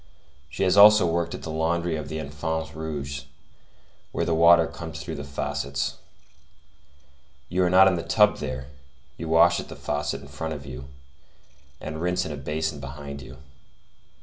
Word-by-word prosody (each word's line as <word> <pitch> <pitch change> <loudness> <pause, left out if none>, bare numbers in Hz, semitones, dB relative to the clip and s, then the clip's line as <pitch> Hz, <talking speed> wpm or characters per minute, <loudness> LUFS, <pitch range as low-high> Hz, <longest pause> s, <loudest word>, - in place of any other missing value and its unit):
She 95 - -2
has 95 +1 +3
also 105 -1 +8
worked 85 0 -1
at - - -10
the 80 - -5
laundry 85 +1 0
of 75 -2 -5
the 80 - -4
Enfants 80 +2 -4
Rouges, 75 -3 -5 0.9
where - - -1
the 85 - 0
water 85 +1 +6
comes 80 -2 -8
through 70 - -6
faucets. 70 0 -3 1.5
You 90 +1 +1
are - - +2
not 95 +2 +7
in 95 -2 +2
the - - -2
tub 105 +5 +3
there; 65 -2 -5 0.5
you 80 - -5
wash 85 +2 +5
at - - -7
the - - -8
faucet 75 -1 -3
in - - -11
front 80 +3 -5
of 70 -1 -9
you, 65 0 -8 0.9
and 80 +1 -6
rinse 90 +1 0
in 80 - -5
a - - -4
basin 75 +2 -3
behind 70 +1 -8
you. 65 0 -11
80 Hz, 170 wpm, -25 LUFS, 70-85 Hz, 1.5 s, also